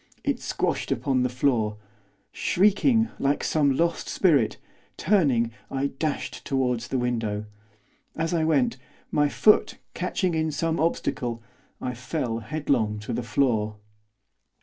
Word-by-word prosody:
It - - 0
squashed - - -2
upon 130 -2 +1
the 125 - +1
floor. 120 -4 +1 0.5
Shrieking 225 +4 +3
like 140 +1 +1
some 140 -4 +2
lost 170 0 0
spirit, 145 - +3 0.4
turning, 140 - +2 0.2
I 135 +1 -1
dashed 155 -2 -2
towards 125 -3 0
the 130 - -1
window. 115 -4 -1 0.7
As 165 +1 -1
I 165 -2 +2
went, 235 +10 +2 0.3
my 145 -1 +3
foot, 210 +8 +4 0.2
catching 185 -4 -1
in 160 0 0
some 160 +2 -1
obstacle, 120 -7 -1 0.4
I 125 - -3
fell 125 -1 -3
headlong 120 -4 0
to 110 - -5
the 120 - -1
floor. 115 -4 +1
140 Hz, 125 wpm, -26 LUFS, 120-160 Hz, 0.7 s, foot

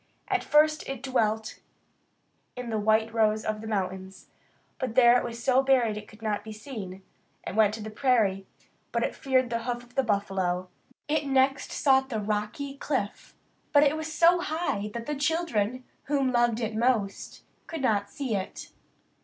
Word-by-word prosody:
At - - +1
first 305 0 +3
it 270 -2 -5
dwelt 220 -4 0 1.0
in 250 -2 -5
the 220 - 0
white 220 +1 +2
rose 215 -1 +2
of 215 0 -2
the 220 - -7
mountains; 190 -2 -4 0.5
but 250 -3 -3
there 240 -1 +7
it 245 - +2
was 235 0 -6
so 260 0 +4
buried 255 -5 +3
that 210 - -5
it 210 - -19
could 215 +1 -16
not 210 -2 -1
be 220 - -8
seen. 210 -5 -8 0.4
It - - -4
went 215 -1 +4
to 220 - -7
the 215 - -6
prairie; 215 -6 +1 0.4
but - - 0
it - - -1
feared 260 -3 +1
the 230 - 0
hoof 245 -1 -3
of 245 0 -20
the 270 - +2
buffalo. 195 -5 -1 0.4
It 300 -1 0
next 270 0 +2
sought 265 -2 +3
the 225 -4 -2
rocky 215 +7 -3
cliff; 255 -9 -3 0.4
but 290 - +6
there 290 -1 +5
it - - -3
was 315 0 -4
so 340 +2 +5
high 315 - -2
that 230 -1 -4
the 295 - -2
children, 275 -6 0 0.2
whom 275 -2 +1
it - - -3
loved 235 -2 +1
most, 220 -4 -1 0.2
could 320 -4 -5
not 205 -4 +1
see 255 -1 -3
it. 190 -1 -5
235 Hz, 185 wpm, -27 LUFS, 210-270 Hz, 1.0 s, there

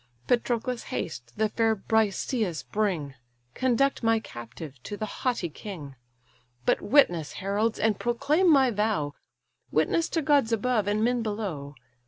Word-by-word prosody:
Patroclus, 245 0 0
haste, 120 -7 -5
the 220 0 +3
fair 225 +1 +2
Briseïs 215 - 0
bring; 180 -10 0 0.4
Conduct 260 - +1
my 225 -1 +3
captive 130 - -9
to 205 - -6
the 215 - -2
haughty 240 -4 -2
king. 155 -5 -8 0.7
But - - +2
witness, 175 - +3
heralds, 205 +3 0
and 220 -2 +1
proclaim 285 +9 +2
my 265 -4 +5
vow, 205 -9 0 0.6
Witness 335 0 +1
to 325 - 0
gods 280 -5 +3
above, 225 -1 +1
and 210 +1 +1
men 245 +1 +2
below! 195 -11 -4
220 Hz, 135 wpm, -27 LUFS, 175-245 Hz, 0.7 s, my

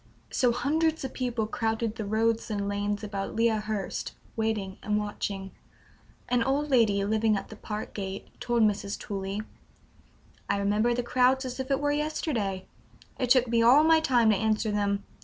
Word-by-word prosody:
So 250 -2 +3
hundreds 315 +6 0
of 260 - -6
people 240 -4 -1
crowded 220 0 -1
the 215 - -4
roads 225 +2 0
and 200 -2 -2
lanes 205 +1 -2
about 200 -1 -4
Lea 230 +1 +3
Hurst, 215 -2 -3 0.2
waiting 215 -4 -2
and 210 0 0
watching. 200 -2 -4 0.8
An 245 -1 +2
old 280 +4 0
lady 210 -6 +3
living 215 0 +2
at - - -6
the 220 - -9
park 210 0 -6
gate 195 -1 -5
told 240 -2 +1
Mrs. 205 -1 0
Tooley: 200 -1 -4 1.1
"I - - +2
remember 210 +4 +2
the 245 - -1
crowds 255 +2 +2
as 255 +1 -5
if 265 +1 -4
it 275 - +2
was 290 0 +1
yesterday. 270 - -2 0.5
It 250 - 0
took 255 0 +5
me 230 0 +2
all 255 +6 +7
my 320 0 +6
time 245 -7 +3
to - - +3
answer 215 +1 0
them. 200 -1 0
220 Hz, 175 wpm, -28 LUFS, 205-250 Hz, 1.1 s, all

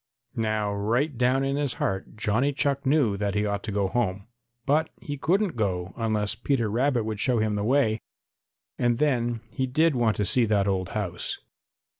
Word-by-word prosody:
Now 110 -3 0
right 120 +9 0
down 125 +3 +2
in 135 +1 0
his 145 -3 0
heart 95 +2 -3
Johnny 110 +7 +1
Chuck 140 0 0
knew 135 -8 +3
that 100 0 -1
he 105 0 +1
ought 100 -1 -1
to 110 - -3
go 100 -1 +1
home, 100 -2 -1 0.4
but 155 +3 +2
he 145 - -5
couldn't 185 - +1
go 95 -4 -2
unless 110 -3 0
Peter 115 -1 0
Rabbit 125 +1 +1
would 110 -1 -4
show 125 +2 +2
him 110 -1 +1
the 105 0 -1
way, 115 -2 +2 0.8
and 120 -1 +2
then 120 -5 +1
he 130 -2 -1
did 155 +5 +3
want 120 -4 +1
to 105 - +1
see 120 +5 +3
that 105 -2 +2
old 95 -2 0
house. 90 -4 -3
115 Hz, 185 wpm, -26 LUFS, 105-135 Hz, 0.8 s, knew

